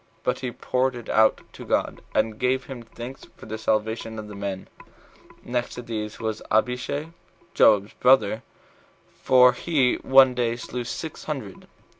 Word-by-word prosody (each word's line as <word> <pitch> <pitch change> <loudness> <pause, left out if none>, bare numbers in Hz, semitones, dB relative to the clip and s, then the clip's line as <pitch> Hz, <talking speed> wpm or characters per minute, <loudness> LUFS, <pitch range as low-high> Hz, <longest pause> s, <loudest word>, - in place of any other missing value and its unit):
But - - 0
he 130 - -3
poured 130 +1 -1
it 120 -2 -9
out 110 0 +4
to - - -10
God, - - -1
and 110 -1 +1
gave 130 +1 +1
him 130 -3 -8
thanks 120 +3 -10
for - - -12
the 110 0 -6
salvation 110 +1 -1
of 110 -1 -7
the - - -8
men. 100 -1 -5 0.8
Next 120 0 -3
to 125 - -7
these 110 -2 -5
was 110 -1 -3
Abishai, 130 +7 0 0.4
Joab's 105 0 +4
brother; 125 -4 +3 0.8
for 125 -1 +6
he 135 -2 +1
in - - -15
one 130 -1 +6
day 120 -2 0
slew 120 0 -5
six - - -6
hundred. - - -6
120 Hz, 160 wpm, -24 LUFS, 110-125 Hz, 0.8 s, for